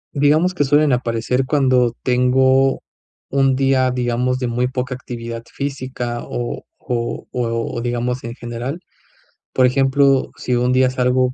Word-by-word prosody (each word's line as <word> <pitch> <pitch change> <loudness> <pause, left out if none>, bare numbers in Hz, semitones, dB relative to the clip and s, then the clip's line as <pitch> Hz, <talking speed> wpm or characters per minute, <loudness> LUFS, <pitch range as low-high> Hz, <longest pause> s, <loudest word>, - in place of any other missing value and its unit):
Digamos 155 +6 +3
que 145 - +1
suelen 145 0 +3
aparecer 125 +1 0
cuando 130 -4 +2
tengo 130 +1 +3 0.5
un 135 -1 +2
día, 130 -1 +2
digamos, 125 0 0
de 130 - -3
muy 125 +1 0
poca 125 0 -3
actividad 115 -2 -7
física, 130 -4 -4
o 120 -1 -4
o 120 -1 -3
o 115 -1 -2
digamos 120 +1 -2
en 115 +1 -6
general. 120 +7 -5 0.7
Por 130 - +4
ejemplo, 135 +1 +3
si 125 - -2
un 125 +1 +1
día 130 0 +3
salgo, 125 0 +1
125 Hz, 140 wpm, -19 LUFS, 120-135 Hz, 0.7 s, Por